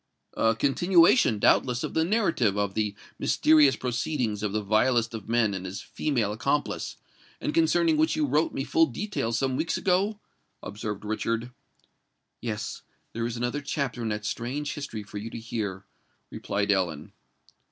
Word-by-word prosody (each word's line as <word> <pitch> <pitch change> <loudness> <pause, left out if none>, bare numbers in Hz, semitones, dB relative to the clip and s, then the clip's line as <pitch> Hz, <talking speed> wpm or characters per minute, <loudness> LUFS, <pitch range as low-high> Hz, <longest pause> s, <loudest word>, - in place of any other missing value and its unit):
"A 115 0 +2
continuation, 140 - +4
doubtless, 125 +3 +3
of - - -4
the 160 - +2
narrative 165 - +1
of 100 -1 0
the 105 -1 -1 0.2
mysterious 150 -4 +5
proceedings 120 -3 -2
of 105 -2 -1
the 105 +1 -1
vilest 115 +2 +2
of 110 -1 -7
men 115 -3 +2
and 95 -1 -4
his 95 +1 -5
female 120 -9 -1
accomplice, 140 +6 -1 0.4
and 150 - -2
concerning 165 0 +3
which 155 +1 +2
you 155 - +1
wrote 150 +4 +1
me 135 - -3
full 165 +3 +3
details 125 - -2
some 130 0 0
weeks 165 +5 -1
ago?" 195 +3 +1 0.4
observed 105 0 -5
Richard. 115 +3 -2 0.9
"Yes—there 115 +1 -5
is 120 0 -5
another 120 +4 -2
chapter 140 -3 -3
in 115 - -2
that 105 0 -3
strange 140 +7 -3
history 115 -7 -6
for 105 0 -7
you 110 +3 -6
to - - -7
hear," 105 -4 -4 0.5
replied 100 0 -1
Ellen. 85 -6 -1
120 Hz, 155 wpm, -27 LUFS, 105-150 Hz, 0.9 s, mysterious